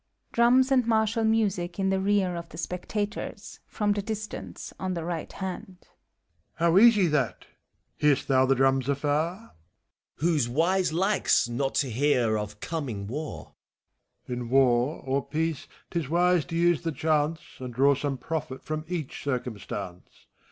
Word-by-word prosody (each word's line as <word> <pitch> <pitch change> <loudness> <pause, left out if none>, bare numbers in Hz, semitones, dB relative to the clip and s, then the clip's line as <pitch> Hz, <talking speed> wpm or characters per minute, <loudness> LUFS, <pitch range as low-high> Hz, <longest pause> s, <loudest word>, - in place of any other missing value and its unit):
(Drums 255 +3 +4
and 255 -3 +3
martial 220 0 +2
music 200 -6 +1
in 195 -1 +1
the 190 - +1
rear 195 -2 +1
of 170 0 -6
the 160 - -11
spectators, 205 +4 -4
from 210 -1 0
the 205 0 0
distance, 215 0 -6
on 185 -1 -2
the 170 - -3
right 170 -1 -4
hand,) 190 -1 -6
MBPHISTOPHBLES. - - -36
How 170 +1 +3
easy, 220 -4 +6
that! 150 -7 0 0.3
— - - -37
^Hear'st 150 -2 +3
thou 130 -1 +3
the 135 - +4
drums 135 0 +2
afarf 140 -1 +1
FAUST. 155 +8 -1 0.6
Who's 150 -6 +1
wise 175 +7 +2
likes 190 - +2
not 135 +3 -2
to 135 -4 +1
hear 125 -3 +2
of 105 -1 -4
coming 130 -12 -4
war. 145 +8 -6 0.7
MEPHI8T0PHE14BS. 125 - -4
In 120 -1 -5
War 130 +2 +3
or 135 +1 0
Peace, 160 -2 -2 0.2
't 170 - 0
is 145 -5 -5
wise 175 -1 +3
to 165 - -6
use 170 -1 +3
the 165 -1 -2
chance, 155 +2 0 0.2
And 125 -1 -6
draw 135 +4 +4
some 140 0 -2
profit 150 0 -4
from 155 0 -3
each 165 -6 -5
eircuiostance. 105 -8 -4
160 Hz, 165 wpm, -27 LUFS, 135-190 Hz, 0.7 s, easy